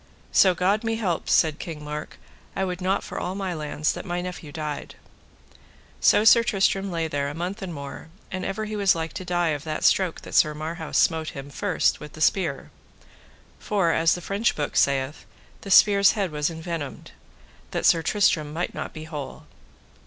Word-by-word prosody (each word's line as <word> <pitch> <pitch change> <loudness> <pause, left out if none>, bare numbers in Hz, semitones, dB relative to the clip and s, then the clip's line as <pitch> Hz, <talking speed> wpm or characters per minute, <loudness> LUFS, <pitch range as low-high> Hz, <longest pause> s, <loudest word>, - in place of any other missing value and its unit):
So 185 -2 +5
God 195 +5 +1
me 225 0 0
help, 190 -7 -2
said 155 -1 +3
King 155 -3 -7
Mark, 150 0 -6 0.4
I 195 - 0
would 180 0 -4
not 190 +2 0
for - - -6
all 180 +2 -3
my 195 -2 -3
lands 150 -1 -1
that - - -6
my 175 -2 -3
nephew 180 -4 -6
died. 150 -1 -5 1.0
So 210 - +5
Sir 230 +1 +7
Tristram 195 -2 +1
lay 165 -2 -1
there 145 -2 -2
a 145 - -7
month 180 +6 -4
and 190 -2 -5
more, 140 0 -8 0.2
and 185 -1 -4
ever 215 +4 -3
he 215 0 -5
was 200 -3 +3
like 165 -1 -4
to - - -5
die 175 -2 0
of 145 -2 -2
that 155 -1 -3
stroke 185 -4 +2
that - - -11
Sir 150 -1 +4
Marhaus 160 +1 -4
smote 160 -2 +2
him 140 +1 -8
first 190 +3 0
with 150 0 -10
the - - -11
spear. 160 -4 +1 0.9
For, 195 -5 +1
as 165 0 +3
the 175 - -7
French 200 +6 0
book 145 - -3
saith, 140 +1 +1 0.4
the 200 - -8
spear's 200 0 +6
head 195 -5 -1
was 150 +1 0
envenomed, 165 -3 -6 0.6
that - - -2
Sir 165 - +5
Tristram 160 -5 +1
might 165 +3 -3
not - - -6
be 155 - -8
whole. 150 -4 -7
170 Hz, 190 wpm, -25 LUFS, 155-195 Hz, 1.0 s, Sir